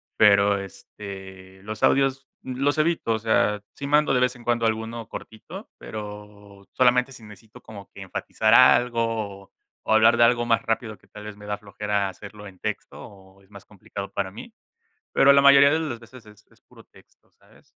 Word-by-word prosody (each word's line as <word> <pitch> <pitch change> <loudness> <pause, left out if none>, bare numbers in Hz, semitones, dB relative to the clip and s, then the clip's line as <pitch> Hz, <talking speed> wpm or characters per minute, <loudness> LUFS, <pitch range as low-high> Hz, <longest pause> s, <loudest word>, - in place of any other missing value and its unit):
pero, 100 -1 +4
este, 95 -1 -11
los 110 +1 -7
audios 135 0 +2 0.2
los 135 +3 -1
evito, 155 -7 0
o 110 - 0
sea, 105 -1 +1
si 140 - -7
mando 150 -1 +2
de 125 - +2
vez 125 0 +1
en 120 - -15
cuando 115 -1 0
alguno 110 +1 -4
cortito, 110 - -10
pero 105 -2 -10
solamente 125 +1 +2
si 120 -3 -13
necesito 105 +1 -15
como 100 -3 -12
que 100 - -12
enfatizar 110 +3 -1
algo, 115 -5 +2 0.4
o - - +4
hablar 110 +2 +5
de 120 - +5
algo 120 0 +2
más 115 -1 +2
rápido 115 -1 -3
que - - -27
tal 105 - -12
vez 105 -1 -9
me 105 0 -13
da 105 0 -3
flojera 100 -1 -3
hacerlo 105 +2 -12
en 95 -2 -13
texto, - - -6
o 95 0 -16
es 95 - -26
más 100 -2 -14
complicado 100 0 -9
para 95 -1 -3
mí, 165 - -12 0.6
pero 140 0 +5
la 140 - +5
mayoría 140 0 +7
de 160 - +1
las 125 -7 -5
veces 120 +1 -15
es 105 -1 -21
puro - - -19
texto, - - -24
¿sabes? - - -25
110 Hz, 185 wpm, -24 LUFS, 100-120 Hz, 0.6 s, mayoría